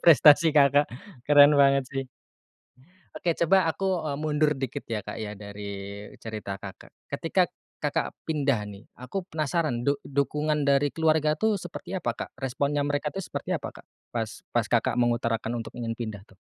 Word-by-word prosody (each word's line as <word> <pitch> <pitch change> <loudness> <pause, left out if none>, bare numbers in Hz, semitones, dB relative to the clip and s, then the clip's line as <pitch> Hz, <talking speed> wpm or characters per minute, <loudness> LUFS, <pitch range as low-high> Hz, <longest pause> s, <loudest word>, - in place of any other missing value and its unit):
prestasi 155 +1 +7
Kakak. 145 -1 +5 0.4
Keren 145 0 +7
banget 140 -1 +5
sih. 135 0 -3 1.1
Oke, 165 +2 -1
coba 170 0 +4
aku, 195 +4 -3 0.2
eee, 140 - -2
mundur 150 0 +2
dikit 130 -3 -4
ya, 110 - 0
Kak, - - -5
ya, 105 -1 -6
dari 100 0 -7
cerita 105 -3 -6
Kakak. - - -10 0.2
Ketika - - +1 0.3
Kakak - - -1 0.2
pindah 145 -5 +1
nih, 100 +2 -11
aku 125 +10 -4
penasaran 155 -5 -1
duk 140 0 +1
dukungan 150 +1 0
dari 140 +1 +3
keluarga 155 -1 +2
itu 220 -1 +2
seperti 180 0 -6
apa, 175 -10 -1 0.2
Kak? - - -22
Responnya 140 +3 0
mereka 145 +1 -1
itu 195 - -3
seperti - - -4
apa, - - -4
Kak? - - -15 0.2
Pas 115 -2 -4
pas 120 -2 +1
Kakak 120 0 +1
mengutarakan 120 -1 0
untuk - - -11
ingin 115 -1 -3
pindah, 110 -3 -6
tuh? - - -21
140 Hz, 165 wpm, -27 LUFS, 115-150 Hz, 1.1 s, prestasi